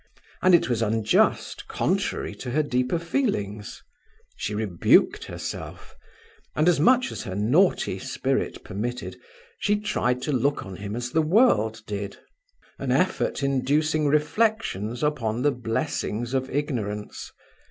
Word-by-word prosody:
And 185 -1 +6
it 170 - +2
was 120 -2 0
unjust, 110 0 +1
contrary - - -1
to - - -7
her 150 +5 +1
deeper 125 +2 0
feelings; 165 - -2 0.5
she 105 - -3
rebuked 100 -6 +3
herself, - - -7 0.6
and 155 +2 +2
as 175 -4 +4
much 255 - +4
as - - -5
her 95 - -5
naughty 135 - +2
spirit - - -2
permitted, 120 +6 -4 0.4
she 205 0 +1
tried 125 -12 -1
to 150 - -1
look 140 +2 0
on 95 -1 -8
him 100 +2 -5
as 120 +1 -4
the 160 - +3
world 115 - +3
did; 100 -1 -5 0.6
an - - -2
effort - - +1
inducing 150 +3 +1
reflections 150 - 0
upon 125 -6 0
the 145 - +4
blessings 120 -1 -2
of 130 0 0
ignorance. 110 -8 -3
125 Hz, 130 wpm, -25 LUFS, 110-155 Hz, 0.6 s, And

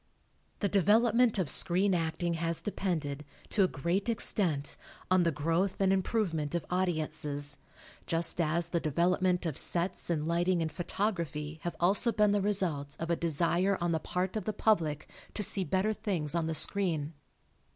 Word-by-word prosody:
The 205 - +2
development 220 +4 +3
of 185 -5 0
screen 185 +7 +3
acting 170 0 -1
has 165 0 -2
depended, 155 -8 -3 0.3
to 205 - +3
a - - +4
great 180 - -2
extent, 170 -10 +1 0.4
on 185 0 +5
the 170 -1 +2
growth 165 +6 -1
and 195 -1 +3
improvement 180 -6 -1
of 170 -3 -2
audi 180 -1 +1
ences, 150 -2 -2 0.5
just 170 +1 +1
as 170 +1 0
the 170 - 0
development 175 +3 +1
of 160 -5 +1
sets 175 +1 -1
and 155 -2 -1
lighting 175 +2 +1
and 160 - -3
photography 165 -4 -3
have 175 - -4
also 200 +7 +3
been 210 -1 +3
the 205 0 +2
result 175 -9 -1
of 165 +1 -3
a - - +3
desire 170 +4 +1
on 175 0 0
the 160 - +1
part 180 +4 -3
of 215 -4 -3
the 215 - -1
public 165 -9 +1 0.3
to 210 - 0
see 195 0 -1
better 190 +6 0
things 170 -9 -3
on 170 -2 0
the 160 - -1
screen. 160 -2 +1
175 Hz, 170 wpm, -30 LUFS, 160-195 Hz, 0.5 s, on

